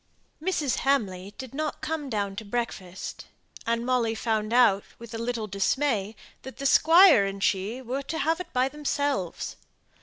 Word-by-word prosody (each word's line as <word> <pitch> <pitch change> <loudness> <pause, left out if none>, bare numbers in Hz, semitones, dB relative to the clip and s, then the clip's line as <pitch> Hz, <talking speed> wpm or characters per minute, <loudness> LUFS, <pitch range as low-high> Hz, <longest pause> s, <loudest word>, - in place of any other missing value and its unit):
Mrs. 315 -7 0
Hamley 205 -8 0
did 260 -2 -8
not 305 +1 -3
come 305 -3 -3
down 200 -4 -2
to 225 - -4
breakfast; 200 -5 -5 0.4
and 230 0 0
Molly 240 -3 +1
found 220 -1 -1
out 225 -5 +5
with 230 -1 -11
a 225 - -4
little 230 -1 -2
dismay, 210 +1 0 0.3
that 265 - -10
the 275 - -5
Squire 325 - +7
and 195 0 -4
she 210 +6 0
were 255 +3 -3
to 305 +4 -5
have 325 +3 +1
it 360 -1 -7
by 255 +1 +2
themselves. 285 - -2
240 Hz, 160 wpm, -27 LUFS, 210-280 Hz, 0.4 s, Squire